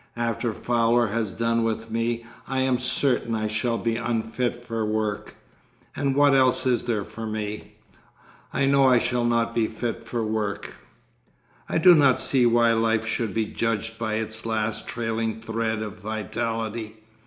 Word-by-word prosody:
After 115 0 -1
Fowler 120 0 +2
has 110 -1 -1
done 115 +2 0
with 115 0 -2
me 115 +1 -1 0.2
I 135 -1 0
am 130 -1 +2
certain 125 -2 +1
I 110 -1 -1
shall 115 +2 -1
be 115 -1 -1
unfit 120 +1 -2
for 115 -1 -2
work—and 110 +5 -4
what 145 0 +5
else 130 -1 +3
is 125 -2 +1
there 110 -4 0
for 110 +3 -7
me?... 105 -1 -5 0.8
I 140 - +1
know 135 0 +4
I 125 -1 +6
shall 120 +1 0
not 115 -1 +1
be 115 -2 +1
fit 115 +1 -4
for 115 -1 -2
work.... 110 -2 -3 1.0
'I - - +1
do 175 +2 +8
not 140 -5 +5
see 125 -3 +3
why 120 0 +4
life 115 0 +1
should 115 -2 -2
be 110 -1 +1
judged 115 0 -2
by 110 -1 -1
its 110 0 -4
last 110 -1 -2
trailing 115 -1 -2
thread 110 -1 -2
of 105 -1 -7
vitality.... 110 +1 -3
115 Hz, 160 wpm, -25 LUFS, 110-120 Hz, 1.0 s, do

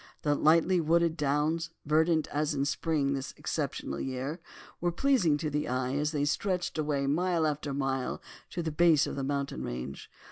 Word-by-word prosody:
The 145 - +3
lightly 165 +4 +4
wooded 165 +1 +2
downs, 150 +2 0 0.2
verdant 160 +1 +3
as 150 +1 -1
in 140 0 0
spring 145 -1 0
in - - +1
this 135 -1 -4
exceptional 70 - -3
year, 135 +5 -3 0.4
were 175 0 0
pleasing 180 - +3
to 150 0 -3
the 150 +1 -1
eye 130 +1 -1
as 150 +1 0
they 145 -2 0
stretched 180 +2 -1
away 145 -2 0
mile 170 +3 +1
after 150 -1 -2
mile 135 -2 -1 0.3
to 175 - -4
the 160 - -2
base 160 -1 +4
of - - -4
the 135 - -3
mountain 140 - -2
range. 65 +2 -6
150 Hz, 180 wpm, -30 LUFS, 140-165 Hz, 0.4 s, lightly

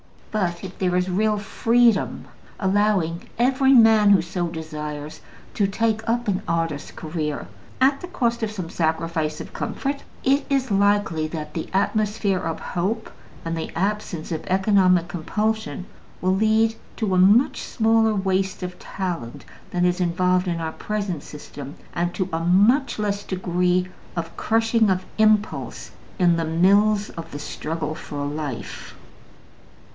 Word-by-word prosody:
But 180 -5 -1
if 190 -1 -8
there 180 -1 +1
is 180 +1 +1
real 210 +3 +1
freedom, 230 +1 +2 0.3
allowing 190 -4 +1
every 265 +3 +4
man 220 -4 +7
who 195 -4 +6
so 175 +1 -2
desires 155 -2 -6 0.3
to 200 - +2
take 220 +2 -1
up 240 0 0
an 190 -2 0
artist's 165 -3 -1
career 155 -2 -4 0.3
at 275 +1 +4
the 360 - -6
cost 235 -9 -1
of 220 - 0
some 185 -6 -6
sacrifice 160 -1 -1
of - - -10
comfort, 280 +1 -3 0.2
it 275 +2 +2
is 265 -4 0
likely 200 -5 +2
that 155 -1 -6
the 160 - -4
atmosphere 205 0 +1
of 165 -1 -3
hope, 205 +6 -2 0.3
and 165 0 -2
the 160 - -4
absence 195 -4 -2
of 160 - -3
economic 185 -2 +3
compulsion, 210 +4 -2 0.4
will 185 +1 +2
lead 220 +2 +3 0.2
to 210 -5 -1
a - - +3
much 205 +8 +5
smaller 225 -1 +2
waste 190 -1 0
of 180 0 -6
talent 175 -11 -5 0.2
than 180 0 +1
is 180 0 +1
involved 180 +1 +2
in 170 -1 -1
our 160 -1 -2
present 200 -5 -3
system, 145 -1 -9 0.2
and 175 0 -1
to 185 - -1
a 165 - 0
much 205 - +3
less 205 -1 -1
degree 180 -1 0 0.3
of 165 -1 -4
crushing 225 -1 +2
of 185 -1 0
impulse 215 -1 +1 0.3
in 175 -4 +4
the 165 - 0
mills 200 +6 +3
of 165 - -8
the 145 - -5
struggle 155 +1 -4
for 145 -2 -5
life. 145 -4 -5
185 Hz, 150 wpm, -23 LUFS, 165-215 Hz, 0.4 s, man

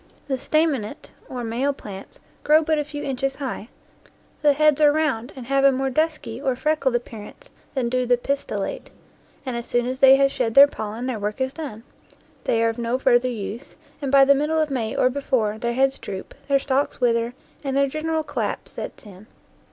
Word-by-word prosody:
The 265 -2 -1
stanainate, 280 -6 -1 0.2
or 250 -2 -5
male, 245 +5 0
plants 195 -7 -10 0.2
grow 310 +1 +5
but 310 -1 +1
a - - 0
few 290 0 -7
inches 270 0 -2
high; 260 -5 -5 0.7
the 295 -1 +5
heads 305 0 +3
are 295 -1 +7
round 290 -6 -1
and 255 -3 -8
have 275 +2 +1
a 275 - +7
more 265 0 -1
dusky 305 -5 -1
or 265 -3 0
freckled 275 -1 0
ap 240 - -1
pearance 225 - -11 0.2
than 255 -3 0
do 250 +1 0
the 245 0 +4
pistillate; 280 +3 -3 0.6
and 255 -2 -3
as 235 0 -5
soon 240 0 +1
as 255 +1 -3
they 270 -1 +8
have 275 0 +3
shed 245 -5 -1
their 280 +1 +11
pollen 220 -3 -5
their 255 -4 -2
work 210 +4 -3
is 260 0 -1
done, 250 -9 -7 0.6
they 230 0 +2
are 230 - +3
of 225 +1 -5
no 235 +2 0
further 255 -1 +3
use, 225 +1 -6 0.3
and, 275 -2 -2
by 275 -1 +7
the 280 - +6
middle 300 +3 0
of 310 -2 0
May 230 -5 -2
or 255 - +3
before, 235 -6 -1
their 235 0 -1
heads 270 +2 +2
droop, 190 -1 -7
their 280 -1 +4
stalks 275 +1 -1
wither, 235 -1 +1 0.3
and 270 -1 -1
their 280 - +4
gen 310 +3 -5
eral 320 -1 0
collapse - - -3
sets - - -8
in. 200 +1 -13
265 Hz, 205 wpm, -23 LUFS, 235-280 Hz, 0.7 s, their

